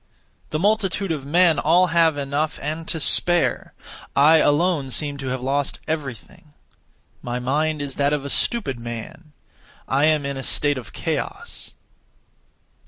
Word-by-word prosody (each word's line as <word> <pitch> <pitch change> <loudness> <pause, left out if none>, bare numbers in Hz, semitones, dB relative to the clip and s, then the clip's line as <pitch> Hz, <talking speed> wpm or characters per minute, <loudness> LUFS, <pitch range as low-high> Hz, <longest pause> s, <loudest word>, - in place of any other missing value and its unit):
The 155 - -2
multitude 200 0 0
of 140 -4 -4
men 170 +1 +4
all 175 +4 +4
have 165 -3 +3
enough 145 +2 -2
and 155 +3 -4
to 165 - -2
spare. 175 +3 +2 0.4
I 155 +3 +6
alone 150 -1 +2
seem 145 +2 0
to 135 -1 -6
have 130 0 -3
lost 140 +1 -1
everything. 150 -1 -6 0.7
My 120 0 -4
mind 145 +4 -1
is 140 -2 -6
that 140 0 +2
of 145 -2 -1
a - - -4
stupid 145 - 0
man; 120 +8 -8 0.6
I 140 +3 +2
am 155 -2 +2
in 140 -1 -3
a - - -4
state 145 -1 +1
of 120 - -12
chaos. - - -4
150 Hz, 150 wpm, -22 LUFS, 140-160 Hz, 0.7 s, I